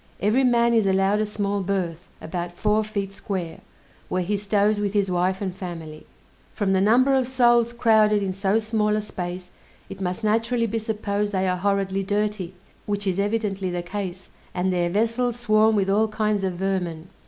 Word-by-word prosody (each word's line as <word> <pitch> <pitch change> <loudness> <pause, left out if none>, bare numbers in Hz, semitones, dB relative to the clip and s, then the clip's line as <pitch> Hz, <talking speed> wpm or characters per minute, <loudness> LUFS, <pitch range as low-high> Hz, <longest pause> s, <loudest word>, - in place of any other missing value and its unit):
Every 220 +7 +2
man 235 -1 +3
is 220 -3 +3
allowed 195 +2 +2
a 215 - 0
small 205 -1 -2
berth, 180 -3 -3
about 175 +1 -5
four 210 +4 +1
feet 200 -2 -4
square, 185 -4 -5 0.5
where 185 0 0
he 205 +4 -1
stows 205 +1 +1
with 205 -1 -1
his 200 -3 +1
wife 185 +2 0
and 185 -2 -3
family. 165 -5 -8 0.5
From 200 -3 +1
the 190 - +3
number 250 +7 +4
of 260 -2 +2
souls 240 -2 +3
crowded 220 -3 +3
in 190 -1 -2
so 195 +2 +1
small 215 -1 0
a 215 - 0
space, 180 -2 -6 0.4
it 195 0 -8
must 180 +3 -3
naturally 230 +2 +1
be 225 +1 -2
supposed 210 -1 -2
they 190 0 +1
are 180 0 0
horridly 195 0 0
dirty, 205 -2 -2 0.3
which 205 0 -2
is 190 -1 0
evidently 200 -2 -1
the 175 -1 -3
case, 185 0 -6 0.2
and 185 +1 0
their 175 -1 +1
vessels 230 +5 0
swarm 215 -1 +3
with 195 -2 +1
all 210 +3 +3
kinds 215 -2 -1
of 190 -1 -1
vermin. 180 -3 -2
200 Hz, 185 wpm, -24 LUFS, 185-215 Hz, 0.5 s, number